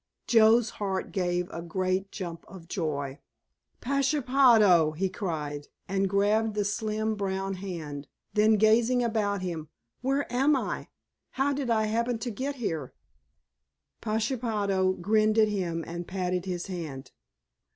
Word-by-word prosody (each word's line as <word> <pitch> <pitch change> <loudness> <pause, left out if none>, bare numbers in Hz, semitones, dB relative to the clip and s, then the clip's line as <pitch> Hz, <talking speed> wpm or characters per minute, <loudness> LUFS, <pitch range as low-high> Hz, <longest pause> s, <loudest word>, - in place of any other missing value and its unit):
Joe's 225 0 +5
heart 190 -2 -2
gave 180 -1 0
a 170 - -5
great 185 +3 -1
jump 170 -4 -6
of 175 -2 -12
joy. 145 -6 -3 0.6
"Pashepaho!" 250 - +4
he 190 +4 -1
cried, 150 -7 -4 0.2
and 195 0 0
grabbed 210 +2 +2
the 205 -1 0
slim 215 +1 -1
brown 195 -1 -2
hand. 165 -7 -6 0.3
Then 215 +1 +4
gazing 230 +4 +4
about 205 -4 0
him, 165 -4 -4 0.3
"Where 275 +3 0
am 275 +4 +4
I—how 270 +1 -4
did 275 -3 -3
I 220 -2 +3
happen 235 +2 0
to 235 +2 -4
get 270 +6 -3
here?" 165 - -4 1.1
Pashepaho 215 -4 0
grinned 215 +4 +2
at 215 -1 +5
him 175 -5 -2
and 175 +1 -6
patted 180 -1 -2
his 180 -2 -3
hand. 160 -8 -6
200 Hz, 130 wpm, -28 LUFS, 175-225 Hz, 1.1 s, Joe's